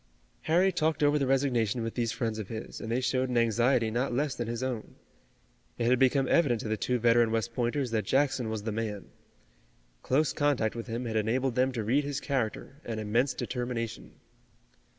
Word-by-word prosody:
Harry 180 +4 +3
talked 155 -3 0
over 145 +1 +4
the 135 - 0
resignation 125 -4 +1
with 115 - -3
these 115 -2 -1
friends 110 -2 -2
of 105 - -5
his, 110 +1 -7
and 110 - -5
they 120 - +1
showed 130 0 0
an 125 - 0
anxiety 115 +1 +2
not 125 +4 -1
less 140 +3 0
than 120 - -4
his 120 +2 -3
own. 125 -4 -4 0.8
It 120 - -1
had 125 +1 +3
become 135 0 +3
evident 130 -10 +3
to - - -5
the 110 - 0
two 125 +3 0
veteran 120 0 +4
West 115 +1 -1
Pointers 120 +2 -1
that 110 -2 0
Jackson 130 +1 +1
was 110 -2 -4
the 110 - -2
man. 105 -2 -4 0.9
Close 140 - +1
contact 140 -7 +1
with 115 0 -6
him 120 +2 -3
had 110 -1 -1
enabled 120 +4 0
them 130 +2 +2
to 115 -3 -2
read 130 +7 +2
his 140 -1 -3
character 135 -1 -3
and 115 -2 -4
immense 115 +6 +1
determination. 120 -3 -4
120 Hz, 195 wpm, -29 LUFS, 115-135 Hz, 0.9 s, over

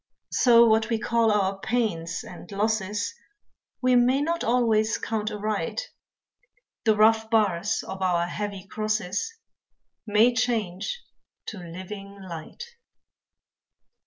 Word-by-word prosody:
So 235 -2 +6
what 220 0 +3
we 230 - +1
call 230 0 +2
our 195 -2 +1
pains 195 -9 -1
and 175 +1 -11
losses 205 - -1 0.7
We 255 0 +4
may 250 +2 +4
not 335 +3 -1
always 225 -2 +2
count 215 -1 -2
aright, 210 - -3 0.9
The 220 -1 +4
rough 220 +1 +4
bars 210 -1 +1
of 190 0 -6
our 175 -2 +2
heavy 200 +1 -5
crosses 215 - -2 0.7
May 215 +4 +4
change 225 - -1 0.5
to 210 - -8
living 195 +3 -9
light. 170 - -8
215 Hz, 110 wpm, -26 LUFS, 195-230 Hz, 0.9 s, So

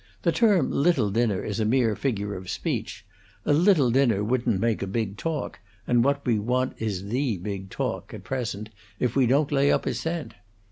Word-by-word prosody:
The - - +3
term 205 - +3
little 140 - +2
dinner 110 -2 +1
is 105 +1 -3
a - - +2
mere 115 -1 +2
figure 105 -6 -2
of 95 0 -8
speech. - - -3 0.4
A - - +3
little 155 - +4
dinner 120 -6 +3
wouldn't 120 -2 0
make 115 0 0
a 100 - -2
big 100 0 -2
talk, 150 +4 -4 0.3
and 120 -1 +3
what 140 +1 0
we 115 -4 +2
want 125 +4 0
is 100 -3 -3
the 125 -2 0
big 95 +1 -5
talk, - - -4
at - - -9
present, 110 -5 -4 0.3
if 125 -2 0
we 135 -3 +4
don't 140 +4 +2
lay 140 0 +3
up - - +1
a - - 0
cent. 165 -1 -4
120 Hz, 195 wpm, -26 LUFS, 105-140 Hz, 0.4 s, little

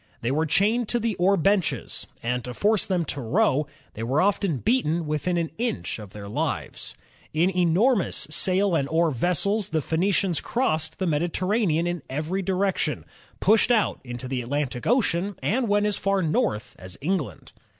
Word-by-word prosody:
They 120 - 0
were 155 +3 +1
chained 210 +8 +2
to 240 - +1
the 230 -1 0
oar 195 +3 +3
benches, 195 +1 0 0.2
and 125 +1 -1
to 125 -1 -6
force 210 - +2
them 180 -3 0
to 140 -1 -3
row, 150 - +2 0.3
they 110 - -7
were 130 +6 +1
often 195 -4 +1
beaten 170 - +1
within 155 +4 -1
an 165 -2 -1
inch 235 - -2
of 105 -2 -9
their 100 +1 -9
lives. 100 - -3 0.4
In 175 +4 +3
enor 180 +8 +3
mous 195 - -2
sail 190 +3 +2
and 140 -4 +1
oar 165 0 +2
vessels 180 - 0
the 160 - 0
Phoenicians 175 +3 +1
crossed 160 - -1
the 190 - -1
Medi 160 0 +1
terranean 185 -2 +1
in 175 -2 -2
every 155 +8 -2
direction, 190 +1 -1 0.3
pushed 220 +2 +4
out 225 -4 +2
into 125 0 -6
the 130 -1 -2
Atlantic 130 0 -3
Ocean, 205 -5 +1
and 245 +3 +1
went 205 0 +2
as 210 -1 +1
far 195 -1 +1
north 110 -9 -1
as 95 0 -9
England. 165 0 -3
175 Hz, 175 wpm, -25 LUFS, 150-200 Hz, 0.4 s, pushed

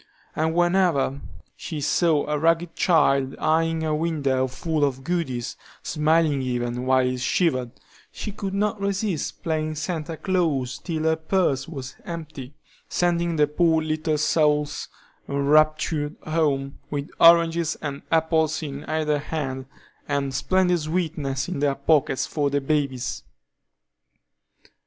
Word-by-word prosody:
And 160 +1 0
whenever 175 -6 +2 0.3
she 155 - -6
saw 155 +1 +2
a 150 0 -1
ragged 165 +1 +1
child 140 -6 +3
eying 160 +1 +1
a 155 -1 0
window 145 -5 0
full 155 +4 -2
of 135 -2 0
goodies, 140 -9 -2 0.3
smiling 155 -2 +2
even, 125 0 -2
while 130 0 +4
it 125 0 -1
shivered, 130 -2 +1 0.4
she 210 - -6
could 195 -1 -4
not 210 +1 0
resist 200 -4 -2
playing 155 -1 -1
Santa 160 0 -4
Claus 155 -10 0
till 160 -3 -3
her 160 0 +3
purse 160 -4 0
was 135 -6 -7
empty, 155 -7 -7 0.3
sending 170 -1 +1
the 150 -1 +4
poor 160 +2 +2
little 155 0 -1
souls 150 -1 +1 0.4
enraptured 150 +1 +2
home 145 -3 -1
with 145 -1 -4
oranges 170 -1 +5
and 140 -2 -5
apples 160 -1 +2
in 140 -1 -6
either 155 -1 0
hand, 135 -4 -4 0.4
and 140 -1 -1
splendid 180 +3 +2
sweeties 155 -4 -2
in 175 -5 -4
their 140 -1 +1
pockets, 140 -1 +2
for 145 -2 -1
the 145 +1 +1
babies. 140 -3 -1
155 Hz, 130 wpm, -24 LUFS, 140-165 Hz, 0.4 s, oranges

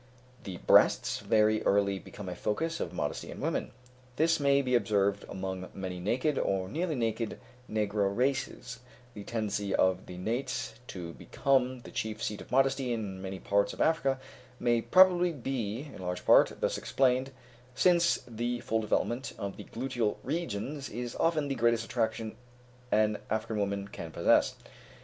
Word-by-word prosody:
The 95 -3 -5
breasts - - +4
very 110 0 +3
early 100 -1 +2
become 100 0 -10
a 90 - -3
focus 160 - -2
of 85 - -3
modesty 75 -5 -3
in - - -8
women; - - -1 0.5
this 165 +3 +3
may 140 -1 +3
be 125 -1 -1
observed 100 -3 +2
among 95 -1 -5
many 95 -2 -5
naked, 130 - 0
or 95 -1 0
nearly 160 - -2
naked, 115 -2 -2 0.3
negro 105 -2 +1
races; 125 +1 -1 0.3
the 105 - -8
tendency 105 -3 -2
of 95 0 +2
the 90 - -8
nates 115 +8 -2
to 85 -3 -6
become 130 -2 0
the - - -11
chief 110 0 -3
seat 105 - -3
of - - -13
modesty 135 -1 +2
in 100 -5 -3
many 95 0 -5
parts 100 +1 +1
of - - -12
Africa 140 -5 +2 0.4
may 120 -1 +2
probably 180 +2 +5
be, 130 -1 -4
in - - -9
large 90 0 -4
part, - - +5
thus - - 0
explained, 130 0 +2 0.5
since 170 +4 +4
the 120 +1 -2
full 110 -1 0
development 120 +4 -1
of 100 -1 -4
the - - -9
gluteal 120 -3 -2
regions 140 -2 -3
is 120 +1 -5
often 160 -3 +1
the 140 - -1
greatest 115 -2 +2
attraction 110 -2 -2 0.6
an 105 0 +3
African 110 0 -1
woman 100 0 -1
can 85 -4 -7
possess. - - +3
115 Hz, 160 wpm, -30 LUFS, 100-135 Hz, 0.6 s, probably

